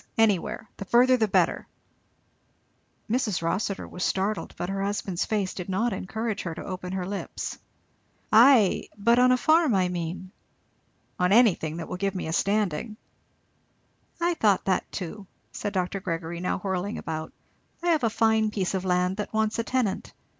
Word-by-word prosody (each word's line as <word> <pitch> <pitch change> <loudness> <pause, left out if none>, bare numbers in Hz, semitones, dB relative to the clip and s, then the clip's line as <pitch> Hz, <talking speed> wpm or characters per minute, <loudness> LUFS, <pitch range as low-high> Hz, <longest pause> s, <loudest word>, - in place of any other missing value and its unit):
anywhere! 215 -1 +1
the 195 - -6
further 250 +4 +5
the 225 -3 +2
better." - - +1 1.4
Mrs. 220 -7 0
Rossitur 195 +4 -1
startled, 195 +3 -1
but 175 - -3
her 195 +1 -3
husband's 195 -3 -2
face 205 -4 -1
did 180 0 -6
not 215 +4 0
encourage 220 +3 -3
her 170 -2 -5
to - - -7
open 185 -1 -5
her 185 -1 -2
lips. 200 +1 -5 0.7
"Ay 230 -2 +6
but 235 +4 +3
on 255 0 +5
a 255 - +4
farm, 315 -3 +4
I 185 -1 +2
mean?" 180 +1 -5 0.9
"On 180 +1 +2
anything, 195 -8 +4
that 165 - -5
will - - -5
give 195 +1 -1
me 185 - -3
a 160 - -3
standing." 205 +1 0 1.2
"I 345 +1 +2
thought 210 - +2
that 190 -2 0
too," 195 +1 -6 0.2
said 205 - -4
Dr. 190 0 -1
Gregory, 170 -1 -4
now 180 - -1
whirling 190 +2 -3
about. 155 -1 -5 0.5
"I 350 - +1
have 315 -5 +2
a 230 - +3
fine 220 0 +2
piece 195 -3 -2
of 190 -1 -1
land 180 +1 +1
that 210 - -4
wants 220 0 0
a - - +1
tenant. 230 -5 -1
200 Hz, 165 wpm, -26 LUFS, 180-220 Hz, 1.4 s, Ay